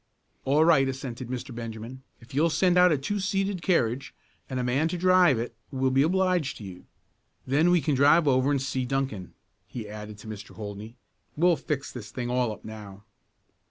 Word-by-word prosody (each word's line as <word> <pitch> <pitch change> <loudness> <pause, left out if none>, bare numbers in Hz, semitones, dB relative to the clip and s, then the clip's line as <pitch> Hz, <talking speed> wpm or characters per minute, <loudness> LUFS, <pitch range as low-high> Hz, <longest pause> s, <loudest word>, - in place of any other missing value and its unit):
"All 145 +4 +4
right," 135 -5 +5
assented 130 -2 -6
Mr. 130 +1 -5
Benjamin. 115 +2 -7 0.2
"If 115 - -16
you'll 155 +5 +3
send 180 +2 +2
out 180 0 +6
a 155 - +3
two 200 +10 -3
seated 195 -1 -1
carriage 130 - 0 0.3
and 130 -2 -3
a - - -1
man 130 +6 +1
to 175 - -3
drive 180 -5 +5
it 115 +2 -4
we'll 130 -1 0
be 135 +1 +3
obliged 180 -2 +1
to - - -10
you. 90 -2 -10 0.6
Then 145 +6 +3
we 175 -2 +4
can 150 - 0
drive 145 +4 +5
over 130 0 +3
and 145 -1 +2
see 130 -1 -2
Duncan," 125 -8 -3 0.3
he 115 -4 -7
added 105 0 -8
to 105 - -12
Mr. 105 -1 -9
Holdney. 105 +2 -8 0.4
"We'll 175 +2 +4
fix 145 -3 -4
this 110 -5 -8
thing 120 +1 -4
all 125 -2 +1
up 105 - -10
now." 105 -2 -10
130 Hz, 195 wpm, -27 LUFS, 115-160 Hz, 0.6 s, out